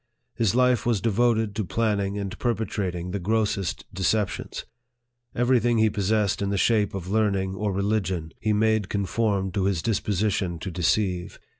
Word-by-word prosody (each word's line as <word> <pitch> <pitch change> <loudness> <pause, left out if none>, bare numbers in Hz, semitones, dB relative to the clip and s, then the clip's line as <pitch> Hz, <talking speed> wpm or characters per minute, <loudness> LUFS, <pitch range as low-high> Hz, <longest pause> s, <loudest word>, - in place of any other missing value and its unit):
His 115 -3 +1
life 125 -2 +3
was 115 -4 +1
devoted 110 -1 +1
to 110 - -1
planning 100 0 0
and 100 -2 -4
perpetrating 95 -7 -2
the 100 - -2
grossest 100 - -1
deceptions. 100 +2 -1 0.7
Every 120 +1 +3
thing 120 +1 +1
he 110 -1 +3
possessed 105 0 0
in 100 - 0
the 100 - 0
shape 105 -1 +2
of 90 -2 -5
learning 100 -3 +1
or 105 +1 -2
religion, 95 -4 -1
he 110 - 0
made 110 -1 +2
conform 100 -1 0
to 95 +1 -1
his 95 -4 0
disposition 100 -4 0
to 95 +3 -6
deceive. 90 +2 0
100 Hz, 155 wpm, -25 LUFS, 95-110 Hz, 0.7 s, life